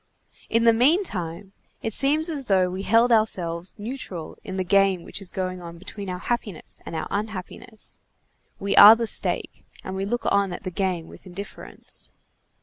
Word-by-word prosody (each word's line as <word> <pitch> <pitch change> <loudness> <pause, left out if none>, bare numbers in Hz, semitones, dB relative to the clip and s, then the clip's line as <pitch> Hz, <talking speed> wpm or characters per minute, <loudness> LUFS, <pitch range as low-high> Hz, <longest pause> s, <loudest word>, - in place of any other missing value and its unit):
In 230 +1 +2
the 230 0 +6
meantime, 220 - 0 0.3
it 225 - -1
seems 300 +6 +4
as 295 -5 -1
though 185 -4 +3
we 185 +1 -4
held 230 +4 +4
ourselves 180 -6 0
neutral 205 -7 -6
in 190 -1 -6
the 185 - 0
game 195 -1 +3
which - - -5
is 190 - -5
going 185 -1 -3
on 170 -1 -9
between 195 +2 -7
our 180 - -3
happiness 210 -3 -3
and - - -5
our - - -3
unhappiness. 215 +2 -4 0.6
We 200 0 -1
are 210 +2 +11
the 230 0 -1
stake, - - -2 0.2
and 190 - -5
we 190 +1 -2
look 240 +4 -2
on 200 -2 +2
at - - -7
the 185 - -4
game 180 -3 -2
with - - -14
indifference. 195 +3 -9
195 Hz, 175 wpm, -24 LUFS, 185-225 Hz, 0.6 s, are